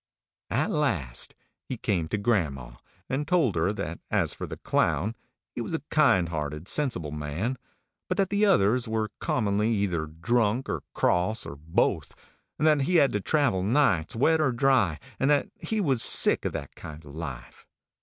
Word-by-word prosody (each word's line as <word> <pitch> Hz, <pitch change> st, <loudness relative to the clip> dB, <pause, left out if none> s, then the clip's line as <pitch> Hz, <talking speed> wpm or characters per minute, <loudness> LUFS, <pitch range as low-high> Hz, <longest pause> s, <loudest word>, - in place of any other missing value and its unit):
At -, -, 0 dB
last 80 Hz, -, -1 dB, 0.3 s
he 130 Hz, -, -6 dB
came 90 Hz, -8 st, -1 dB
to 105 Hz, -, -2 dB
grandma, 75 Hz, -, -1 dB, 0.3 s
and 140 Hz, +2 st, -2 dB
told 155 Hz, -, +2 dB
her 85 Hz, +4 st, +1 dB
that 85 Hz, -5 st, -5 dB
as -, -, +1 dB
for -, -, -6 dB
the -, -, -7 dB
Clown, 110 Hz, +6 st, 0 dB, 0.4 s
he -, -, -4 dB
was 140 Hz, -, -3 dB
a 160 Hz, -, -4 dB
kind 115 Hz, -, +4 dB
hearted, 75 Hz, +1 st, -4 dB
sensible 100 Hz, -, 0 dB
man, 75 Hz, -, -3 dB, 0.5 s
but 185 Hz, -, -2 dB
that 195 Hz, -1 st, +1 dB
the 205 Hz, +1 st, +2 dB
others 125 Hz, -, +3 dB
were 110 Hz, -1 st, -2 dB
commonly 105 Hz, -1 st, 0 dB
either 95 Hz, -8 st, 0 dB
drunk, 115 Hz, +9 st, 0 dB
or -, -, -2 dB
cross, 90 Hz, +7 st, +1 dB
or 70 Hz, -, -7 dB
both, 80 Hz, +3 st, -1 dB, 0.4 s
and 155 Hz, -, 0 dB
that 150 Hz, -2 st, +4 dB
he 180 Hz, -, +1 dB
had 140 Hz, -5 st, +5 dB
to 105 Hz, -, -1 dB
travel 135 Hz, -8 st, +1 dB
nights, 100 Hz, -, +2 dB
wet 160 Hz, +7 st, +3 dB
or 140 Hz, -4 st, +2 dB
dry, 120 Hz, -, +2 dB, 0.2 s
and 135 Hz, -, +2 dB
that 145 Hz, -1 st, +2 dB
he 220 Hz, -, -2 dB
was 135 Hz, -, +1 dB
sick -, -, +4 dB
of -, -, -1 dB
that -, -, -6 dB
kind 80 Hz, -1 st, -10 dB
of 70 Hz, -, -12 dB
life. 80 Hz, -1 st, -8 dB
105 Hz, 175 wpm, -27 LUFS, 80-135 Hz, 0.5 s, had